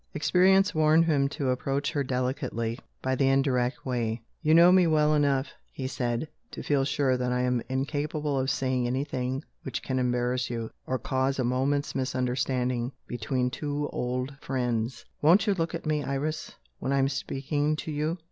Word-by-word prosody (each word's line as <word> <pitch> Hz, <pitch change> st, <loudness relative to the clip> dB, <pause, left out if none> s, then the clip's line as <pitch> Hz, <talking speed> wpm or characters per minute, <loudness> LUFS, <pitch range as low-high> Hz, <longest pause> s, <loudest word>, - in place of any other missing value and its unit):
Experience 190 Hz, +5 st, +4 dB
warned 155 Hz, +1 st, +4 dB
him 140 Hz, -4 st, +2 dB
to 140 Hz, -2 st, -2 dB
approach 135 Hz, +3 st, -1 dB
her 145 Hz, -, 0 dB
delicately, 125 Hz, -2 st, -2 dB, 0.2 s
by 130 Hz, -, +1 dB
the 135 Hz, +1 st, +2 dB
indirect 135 Hz, -2 st, +1 dB
way. 120 Hz, -3 st, -1 dB, 0.2 s
"You 155 Hz, 0 st, +4 dB
know 170 Hz, +2 st, +8 dB
me 185 Hz, -2 st, +5 dB
well 155 Hz, -1 st, +3 dB
enough," 140 Hz, -2 st, +2 dB, 0.2 s
he 130 Hz, -, -6 dB
said, 125 Hz, +1 st, -2 dB, 0.2 s
"to -, -, -7 dB
feel 140 Hz, -2 st, +2 dB
sure 135 Hz, -2 st, +1 dB
that 125 Hz, 0 st, -1 dB
I 125 Hz, 0 st, +1 dB
am 125 Hz, -1 st, +1 dB
incapable 145 Hz, +2 st, -1 dB
of 130 Hz, 0 st, 0 dB
saying 130 Hz, -3 st, 0 dB
anything 130 Hz, +1 st, -2 dB, 0.2 s
which 130 Hz, -5 st, -5 dB
can 130 Hz, -1 st, -1 dB
embarrass 125 Hz, 0 st, 0 dB
you, 115 Hz, -2 st, -4 dB, 0.2 s
or 130 Hz, -, 0 dB
cause 130 Hz, +1 st, 0 dB
a 130 Hz, -, +1 dB
moment's 135 Hz, +4 st, 0 dB
misunderstanding 125 Hz, -1 st, -1 dB
between 125 Hz, +2 st, -1 dB
two 145 Hz, +2 st, -3 dB
old 125 Hz, +2 st, -2 dB
friends. 120 Hz, -3 st, -2 dB, 0.2 s
Won't 170 Hz, +9 st, +5 dB
you 205 Hz, -, +3 dB
look 170 Hz, -2 st, -2 dB
at 165 Hz, -, -6 dB
me, 150 Hz, -1 st, 0 dB
Iris, 150 Hz, +3 st, -3 dB, 0.2 s
when 135 Hz, -, -2 dB
I 140 Hz, -, +2 dB
am 135 Hz, 0 st, +3 dB
speaking 145 Hz, +2 st, -1 dB
to 155 Hz, -, -5 dB
you?" 155 Hz, +3 st, -1 dB
135 Hz, 175 wpm, -28 LUFS, 125-150 Hz, 0.2 s, know